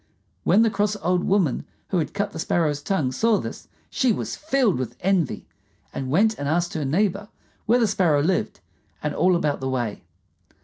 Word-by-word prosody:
When 205 +6 +5
the 225 - +2
cross 210 0 0
old 180 +1 +1
woman 190 -9 +1 0.3
who 185 - +1
had 160 - -3
cut 205 0 -1
the - - -7
Sparrow's 155 -3 0
tongue 150 -6 0
saw 220 - +2
this, - - -6 0.2
she 255 -2 +2
was - - -3
filled 270 - +1
with 120 -2 -4
envy, 180 -6 0 0.5
and 130 -1 -4
went 215 +9 +2
and 145 - -2
asked 175 +2 0
her 155 - -2
neighbor 200 +7 0 0.4
where 235 +3 +5
the 240 - +3
Sparrow 175 -8 +2
lived 185 +3 -1 0.4
and 150 -1 -1
all 185 0 +3
about 150 -4 0
the 130 - -3
way. 120 -5 -2
180 Hz, 185 wpm, -24 LUFS, 145-205 Hz, 0.5 s, When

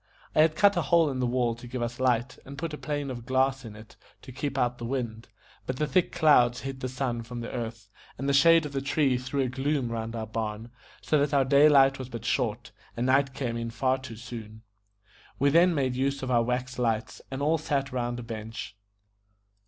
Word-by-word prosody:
I 155 - +5
had 155 0 +3
cut 200 +1 +4
a 175 - +1
hole 160 +1 +3
in 130 - -4
the 125 - +1
wall 120 -1 +1
to 120 +1 -11
give 120 0 -3
us 120 +1 -4
light, 125 0 0
and 140 +1 -10
put 165 +1 -4
a - - -4
pane 145 -2 -3
of 120 -2 -7
glass 135 0 +1
in 110 -3 -9
it 110 +1 -14 0.3
to - - -10
keep 135 +1 -4
out 125 -1 0
the - - -7
wind, 120 -3 -4 0.4
but 130 - -2
the 150 - +1
thick 175 +4 +1
clouds 135 -7 +4
hid 135 -1 -6
the 130 - -3
sun 125 -2 -2
from 120 +1 -7
the 115 - -6
earth, 115 -3 -5 0.3
and 135 - -3
the 140 - +2
shade 165 +3 +6
of 150 - -5
the 135 - -1
tree 140 -1 +1
threw 130 +3 -2
a 130 - +1
gloom 135 0 -1
round 115 0 -4
our 110 -1 -3
barn, 110 +1 -4 0.3
so 155 - +2
that 145 0 +1
our 135 -1 +4
day 140 +3 +6
light 135 -2 +5
was 130 -1 -6
but 115 -4 -7
short, - - -1 0.3
and 120 - 0
night 135 +1 +2
came 125 -4 -2
on 115 0 -3
far 130 +3 0
too 130 -3 -9
soon. 110 -2 -9 0.7
We 140 +1 +3
then 170 +2 +5
made 130 -3 0
use 135 +1 -1
of 130 - -2
our 120 -1 +4
wax 125 +2 -2
lights, 115 -2 -1
and 135 - -5
all 160 +2 +2
sat 140 -3 -1
round 120 -1 -2
a - - -6
bench. 110 -2 -7
130 Hz, 230 wpm, -27 LUFS, 120-140 Hz, 0.7 s, shade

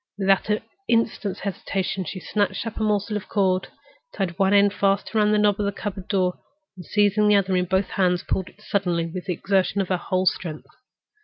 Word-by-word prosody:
Without 195 +1 +2
an 210 0 +1 0.3
instant's 225 -3 0
hesitation, 195 -1 -3
she 185 +4 -5
snatched 205 +4 -1
up 225 - -6
a - - -3
morsel 210 0 0
of 205 - -9
cord, 190 -2 +1 0.4
tied 190 -2 -3
one 195 0 +3
end 200 0 +5
fast 195 +1 0
round 210 -1 +3
the 210 - +3
knob 210 -1 +3
of 205 - 0
the - - 0
cupboard 195 -2 -6
door, 185 -3 0 0.4
and 180 - -10
seizing 210 +3 +2
the 210 - +5
other 195 -1 +2
end 180 - +3
in 180 - 0
both 190 +1 0
hands, 180 -2 +1
pulled 190 -1 -2
it 210 - -22
suddenly 175 -6 0
with 175 +2 -6
the 185 - -1
exertion 195 +3 0
of 195 - -1
her 185 - +2
whole 185 +1 -1
strength. 160 -4 -1
195 Hz, 215 wpm, -24 LUFS, 185-205 Hz, 0.4 s, end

